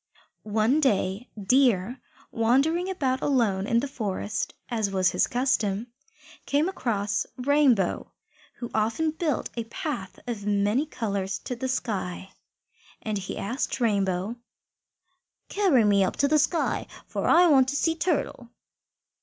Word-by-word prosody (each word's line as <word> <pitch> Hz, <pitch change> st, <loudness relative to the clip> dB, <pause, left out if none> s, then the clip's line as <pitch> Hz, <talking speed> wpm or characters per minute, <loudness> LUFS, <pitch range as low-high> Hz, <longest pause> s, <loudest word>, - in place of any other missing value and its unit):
One 225 Hz, +7 st, +3 dB
day 205 Hz, -3 st, 0 dB
Deer, 245 Hz, 0 st, +2 dB, 0.3 s
wandering 275 Hz, +11 st, +2 dB
about 265 Hz, -8 st, -1 dB
alone 210 Hz, -8 st, +1 dB
in 235 Hz, 0 st, +2 dB
the 285 Hz, -, -3 dB
forest, 215 Hz, -4 st, -3 dB
as 220 Hz, -4 st, -1 dB
was 190 Hz, -2 st, +2 dB
his -, -, +2 dB
custom, 235 Hz, -3 st, 0 dB, 0.5 s
came 290 Hz, +4 st, +2 dB
across 210 Hz, -, -1 dB
Rainbow, 260 Hz, -7 st, +2 dB, 0.4 s
who 240 Hz, -, -7 dB
often 225 Hz, +9 st, +1 dB
built 315 Hz, -3 st, -2 dB
a 230 Hz, -2 st, -3 dB
path 245 Hz, -, -5 dB
of 230 Hz, -5 st, -4 dB
many 210 Hz, +7 st, +1 dB
colours 200 Hz, -7 st, -3 dB
to 250 Hz, -, -4 dB
the 260 Hz, +2 st, -3 dB
sky. 195 Hz, -7 st, -3 dB, 0.7 s
And 215 Hz, -1 st, -2 dB
he 195 Hz, -, -6 dB
said 240 Hz, +7 st, -4 dB
to 250 Hz, -, -1 dB
Rainbow, 200 Hz, 0 st, 0 dB, 1.1 s
"Carry 370 Hz, -, +3 dB
me 200 Hz, -2 st, +4 dB
up 185 Hz, -, -1 dB
to 280 Hz, -, +2 dB
the 305 Hz, +1 st, +3 dB
sky, 325 Hz, +3 st, 0 dB, 0.2 s
for -, -, -3 dB
I 350 Hz, +2 st, +6 dB
want 270 Hz, -6 st, +5 dB
to 285 Hz, -, -2 dB
see 325 Hz, +3 st, +2 dB
Turtle." 310 Hz, -7 st, -2 dB
235 Hz, 135 wpm, -26 LUFS, 205-280 Hz, 1.1 s, I